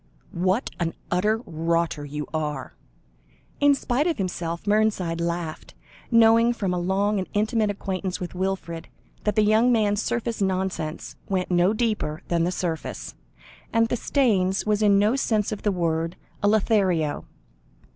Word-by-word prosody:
"What 185 +7 0
an 165 -1 -1 0.2
utter 210 +6 +1
rotter 165 -1 -1
you 150 +1 -5
are!" 150 -4 -3 0.9
In 285 -1 +5
spite 275 +3 0
of 335 - 0
himself 170 -3 -3
Mernside 205 -5 +1
laughed, 170 -2 -4 0.3
knowing 230 0 +5
from 195 -6 -2
a 180 - -1
long 195 +3 +1
and 185 - -4
intimate 215 +1 +1
acquaintance 190 -2 -3
with 180 - -5
Wilfred, 185 -3 -3 0.4
that 210 -2 +1
the 215 - +4
young 220 +4 +4
man's 210 -3 +2
surface 235 -2 -2
nonsense 185 -4 -2
went 185 -2 -1
no 175 +2 +4
deeper 215 -9 -1
than 170 -1 +2
the 180 - 0
surface, 170 -3 -4 0.6
and 230 0 +2
that 240 - -1
Staynes 200 -9 +1
was 210 0 +1
in 205 -2 +5
no 210 +5 +3
sense 220 -6 0
of 215 - -4
the 210 - +1
word 165 -2 -1 0.3
a 205 - +2
Lothario. 195 -7 +2
195 Hz, 150 wpm, -25 LUFS, 170-220 Hz, 0.9 s, In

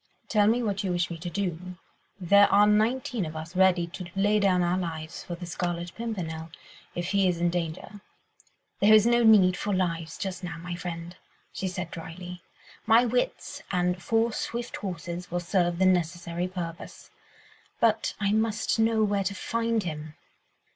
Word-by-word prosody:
Tell 205 -1 +3
me 240 +3 +2
what 200 -3 -1
you 190 - -1
wish 175 0 0
me 165 - -6
to 175 +2 -5
do. 180 -1 -4 0.4
There 200 +3 +5
are 205 +1 +6
nineteen 220 +2 +1
of 160 -1 -6
us 160 +3 -7
ready 185 -2 +4
to 175 +1 -8
lay 205 +2 +3
down 185 -3 +3
our 175 +1 +1
lives 160 -2 -5
for 175 - -5
the 175 +1 -8
Scarlet 175 0 -3
Pimpernel 170 -9 -5 0.5
if 175 0 -3
he 200 -1 +3
is 175 -2 0
in 175 0 +2
danger." 175 +4 -4 0.8
"There 215 +2 +7
is 215 0 +6
no 240 0 +4
need 205 -5 +6
for 200 +2 -1
lives 165 -3 -2
just 190 -2 -5
now, 175 -2 -5
my 175 +1 -6
friend," 175 0 -6 0.4
she 190 - -3
said 180 -2 -5
drily; 175 +2 -8 0.5
"my 230 +2 +6
wits 245 +1 -2
and 180 -1 0
four 225 +3 +1
swift 235 +2 -4
horses 175 -1 -5
will 175 - -1
serve 175 -1 0
the 190 - +3
necessary 175 -1 0
purpose. 175 -2 -7 0.7
But 225 -1 +2
I 200 -1 +1
must 220 +1 0
know 225 0 +3
where 200 -1 +1
to 200 +1 -2
find 230 +1 -1
him. 155 -2 -6
180 Hz, 175 wpm, -27 LUFS, 175-210 Hz, 0.8 s, There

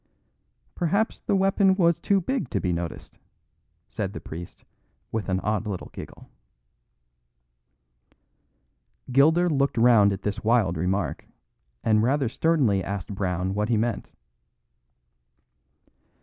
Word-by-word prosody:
"Perhaps 200 +6 0
the - - 0
weapon 195 0 +3
was 170 -3 +2
too 200 -1 +2
big 195 - -2
to 105 - -1
be 90 -2 -1
noticed," 85 0 -6 0.7
said - - -4
the - - -6
priest, 85 +2 -10 0.5
with 110 -3 -3
an 95 0 +1
odd 105 0 -1
little 95 -4 -5
giggle. - - -10 2.8
Gilder 160 +7 +4
looked 140 -5 0
round 115 -4 +5
at 95 0 -5
this 105 +2 -3
wild 110 -6 +2
remark, 90 -1 -2 0.6
and 110 -1 +3
rather 130 +2 +1
sternly 125 - +1
asked 100 +1 -5
Brown 95 -1 -2
what 105 +2 -1
he 115 - +2
meant. 115 +2 -2
110 Hz, 120 wpm, -25 LUFS, 95-160 Hz, 2.8 s, round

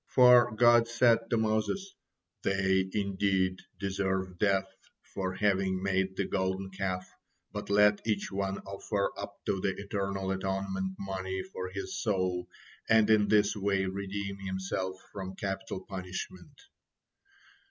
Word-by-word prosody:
For 125 -1 +7
God 120 0 +6
said 120 0 +4
to 115 - +2
Moses: 110 - 0 0.5
"They 95 -1 +2
indeed 95 -2 +1 0.2
deserve 95 -1 -2
death 95 -2 +3 0.5
for 95 -1 -2
having 95 -2 +1
made 95 -1 0
the 100 - +1
Golden 95 0 -1
Calf, 95 -1 -3 0.4
but - - -6
let 105 0 +5
each 105 -2 0
one 95 0 -1
offer 100 +1 -2
up - - -6
to 95 - 0
the 95 - 0
Eternal 100 -1 -2
atonement 95 0 -2
money 95 -1 -3
for 95 0 -6
his 95 0 -5
soul, 90 -4 0 0.4
and 110 -1 +5
in 105 -1 +5
this 105 0 +3
way 100 -1 +1
redeem 100 +1 -4
himself 95 -1 -3 0.2
from 95 -1 -6
capital 95 0 -4
punishment." 95 - -7
95 Hz, 130 wpm, -30 LUFS, 95-105 Hz, 0.5 s, For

